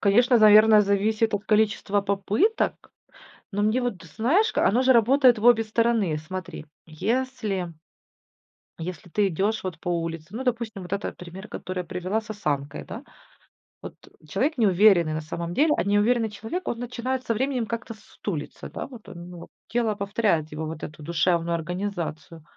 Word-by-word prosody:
конечно, 240 Hz, +5 st, +4 dB
наверно, 215 Hz, 0 st, +7 dB
зависит 210 Hz, +2 st, +1 dB
от 205 Hz, 0 st, -3 dB
количества 210 Hz, -1 st, +2 dB
попыток. 200 Hz, -, 0 dB, 0.6 s
Но 205 Hz, 0 st, -1 dB
мне 215 Hz, +5 st, +2 dB
вот, 240 Hz, -7 st, -3 dB
знаешь, 270 Hz, -, +1 dB
ка -, -, +2 dB
оно 235 Hz, +5 st, +3 dB
же 260 Hz, 0 st, +5 dB
работает 250 Hz, +1 st, +5 dB
в 215 Hz, -, -3 dB
обе 240 Hz, -2 st, +6 dB
стороны. 220 Hz, -6 st, +1 dB
Смотри, 175 Hz, +1 st, -7 dB, 0.2 s
если 210 Hz, +1 st, -2 dB, 1.1 s
если 175 Hz, +1 st, -7 dB
ты 205 Hz, +4 st, +2 dB
идешь 200 Hz, +5 st, -1 dB
вот 180 Hz, -3 st, -5 dB
по 180 Hz, -, -4 dB
улице 165 Hz, +1 st, -3 dB
Ну, 255 Hz, -, -3 dB
допустим, 230 Hz, -6 st, -2 dB
вот 180 Hz, +2 st, -5 dB
это 200 Hz, -, -2 dB
пример, 180 Hz, +3 st, -10 dB
который 185 Hz, 0 st, -6 dB
я -, -, -2 dB
привела 185 Hz, +5 st, -2 dB
с 220 Hz, -, -18 dB
осанкой, 145 Hz, -9 st, -3 dB
да. 235 Hz, -, -8 dB, 0.8 s
Вот. -, -, -9 dB
Э. -, -, -22 dB
Человек 305 Hz, 0 st, 0 dB
неуверенный 190 Hz, -6 st, +4 dB
на 155 Hz, -, -2 dB
самом 170 Hz, +2 st, -5 dB
деле, 300 Hz, -, +3 dB
а -, -, +1 dB
неуверенный 220 Hz, +3 st, +2 dB
человек, 225 Hz, -, -6 dB
он 235 Hz, -, -2 dB
начинает 250 Hz, +1 st, -3 dB
со 230 Hz, -, +1 dB
временем 255 Hz, +1 st, -1 dB
как-то 230 Hz, +1 st, -5 dB
с 215 Hz, -, -19 dB
сутулиться, 165 Hz, -8 st, -6 dB
да, -, -, -6 dB
вот 245 Hz, -5 st, -13 dB
он, 175 Hz, 0 st, -10 dB
ну, 175 Hz, -1 st, -10 dB, 0.2 s
тело 225 Hz, -3 st, 0 dB
повторяет 200 Hz, -6 st, 0 dB
его 155 Hz, +1 st, -4 dB
вот 155 Hz, 0 st, -7 dB
эту 155 Hz, 0 st, -8 dB
душевную 170 Hz, +1 st, +1 dB
организацию. 170 Hz, -2 st, -5 dB
205 Hz, 170 wpm, -25 LUFS, 175-230 Hz, 1.1 s, наверно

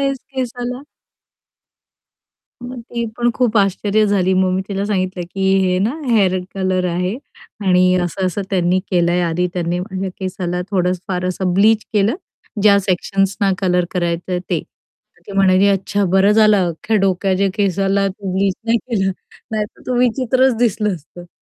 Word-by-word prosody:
आहेस 275 Hz, -1 st, 0 dB, 0.2 s
केसाला? 250 Hz, 0 st, -4 dB, 1.8 s
मग 245 Hz, 0 st, -7 dB
ती 235 Hz, 0 st, -4 dB
पण 240 Hz, 0 st, +2 dB
खूप 240 Hz, -3 st, +1 dB
आश्चर्य 200 Hz, +2 st, +2 dB
झाली. 190 Hz, -2 st, +2 dB
मग 185 Hz, 0 st, +2 dB
मी 190 Hz, +1 st, 0 dB
तिला 200 Hz, -1 st, -2 dB
सांगितलं, 185 Hz, -3 st, -1 dB
की 195 Hz, -, -4 dB, 0.2 s
हे 180 Hz, 0 st, +1 dB
ना, 205 Hz, +4 st, +1 dB, 0.2 s
हेअर 195 Hz, -5 st, +3 dB, 0.2 s
कलर 185 Hz, -1 st, 0 dB
आहे 180 Hz, +3 st, -1 dB, 0.5 s
आणि 185 Hz, 0 st, +4 dB
असं-असं 185 Hz, +2 st, -2 dB
त्यांनी 185 Hz, -1 st, +2 dB
केलं 175 Hz, -2 st, +2 dB
आहे. 180 Hz, -, +1 dB
आधी 175 Hz, +1 st, 0 dB
त्यांनी 175 Hz, 0 st, -1 dB
माझ्या 190 Hz, 0 st, -4 dB
केसाला 180 Hz, -2 st, -3 dB
थोडंस 180 Hz, -2 st, 0 dB
फार 180 Hz, -1 st, -2 dB
असं 185 Hz, 0 st, -1 dB
ब्लीच 215 Hz, +3 st, +4 dB
केलं, 210 Hz, +2 st, +2 dB, 0.5 s
ज्या 200 Hz, -1 st, +6 dB
सेक्शन्सना, 195 Hz, +1 st, 0 dB
कलर 180 Hz, -2 st, +1 dB
करायचं 175 Hz, 0 st, -2 dB
आहे 180 Hz, -, 0 dB
ते. -, -, +1 dB, 0.6 s
तर -, -, -26 dB
ती 200 Hz, -, -8 dB
म्हणाली 190 Hz, 0 st, +4 dB
अच्छा 200 Hz, +1 st, 0 dB
"बरं 195 Hz, +2 st, +4 dB
झालं 215 Hz, -1 st, +5 dB
अख्ख्या 170 Hz, +7 st, -2 dB
डोक्याच्या 195 Hz, 0 st, +1 dB
केसाला 195 Hz, 0 st, +1 dB
तू 195 Hz, 0 st, -6 dB
ब्लीच 190 Hz, 0 st, +1 dB
नाही 230 Hz, +1 st, +3 dB
केलं 205 Hz, -6 st, -1 dB, 0.4 s
नाहीतर 215 Hz, -1 st, -4 dB
तू 250 Hz, -, -1 dB
विचित्रच 255 Hz, +1 st, +2 dB
दिसलं 215 Hz, -3 st, +1 dB
असतं". 175 Hz, +2 st, -13 dB
195 Hz, 155 wpm, -18 LUFS, 185-210 Hz, 1.8 s, ज्या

